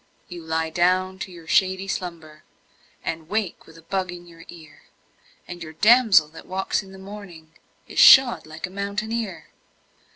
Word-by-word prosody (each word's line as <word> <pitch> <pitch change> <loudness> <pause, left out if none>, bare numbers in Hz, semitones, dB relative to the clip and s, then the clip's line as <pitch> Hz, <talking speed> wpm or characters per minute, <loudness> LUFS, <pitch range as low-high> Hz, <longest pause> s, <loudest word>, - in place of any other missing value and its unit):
You 175 -1 -8
lie 160 0 -2
down 185 +2 +1
to 190 - -6
your 170 -2 -13
shady 190 +2 +1
slumber 165 -5 -6 0.6
And 160 -1 -5
wake 210 -4 -3
with 160 - -16
a 165 - -16
bug 185 +1 -3
in 175 0 -10
your 165 -1 -15
ear, 155 -4 -14 0.6
And 175 0 -9
your 155 -1 -8
damsel 215 -4 +5
that 160 - -14
walks 190 +2 -2
in 195 -1 -15
the 190 - -12
morning 190 -5 -12 0.3
Is - - -4
shod 245 -12 +7
like 155 +2 -6
a 185 - -11
mountaineer. 200 +1 -4
180 Hz, 165 wpm, -23 LUFS, 160-195 Hz, 0.6 s, shod